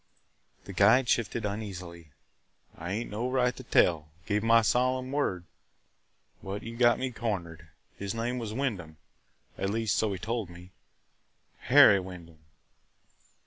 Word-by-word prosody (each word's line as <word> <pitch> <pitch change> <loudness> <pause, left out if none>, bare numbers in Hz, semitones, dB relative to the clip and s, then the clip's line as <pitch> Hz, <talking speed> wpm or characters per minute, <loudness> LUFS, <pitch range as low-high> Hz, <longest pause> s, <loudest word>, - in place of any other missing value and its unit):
The 100 - -9
guide 110 +7 +4
shifted 115 -1 0
uneasily. 90 -6 -6 0.7
"I 85 +2 -6
ain't 110 +3 -4
no 115 +4 -2
right 125 -1 +1
to - - -9
tell 85 -10 +2
– 85 - -31
gave 105 +1 0
my 115 +1 +4
solemn 130 +3 +1
word 140 -11 -1 0.5
– - - -39
but 100 +2 -5
you 115 0 -7
got 120 0 +4
me 130 0 -3
cornered. 85 -8 -5 0.3
His 100 +2 -4
name 120 +2 -2
was 115 -3 -5
Wyndham; 105 - -3 0.6
at 95 - -1
least, 110 0 0
so 110 -2 +1
he 95 - -3
told 110 0 -3
me 90 +1 -13 0.5
– - - -43
Harry 100 - +8
Wyndham." 90 -3 -10
105 Hz, 150 wpm, -28 LUFS, 90-120 Hz, 0.7 s, Harry